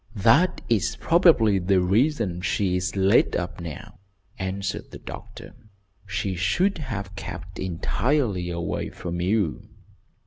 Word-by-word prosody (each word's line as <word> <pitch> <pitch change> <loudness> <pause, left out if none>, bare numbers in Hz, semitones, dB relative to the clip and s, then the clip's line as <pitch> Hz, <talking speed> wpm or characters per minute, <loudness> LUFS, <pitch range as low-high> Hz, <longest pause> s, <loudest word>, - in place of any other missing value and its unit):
"That 130 - +4
is 110 -2 +1
probably 160 - +4
the 95 +1 +2
reason 100 - +1
she 95 0 0
is 90 +1 -2
laid 95 0 +3
up - - -3
now," 80 -5 -8 0.4
answered 95 +1 -3
the - - -9
doctor. - - -10 0.5
"She 95 -1 -2
should 95 - +1
have 100 -9 -5
kept 90 0 -7
entirely 100 - 0
away 85 0 -3
from 85 -1 -5
you." 95 -2 0
95 Hz, 125 wpm, -25 LUFS, 90-115 Hz, 0.5 s, That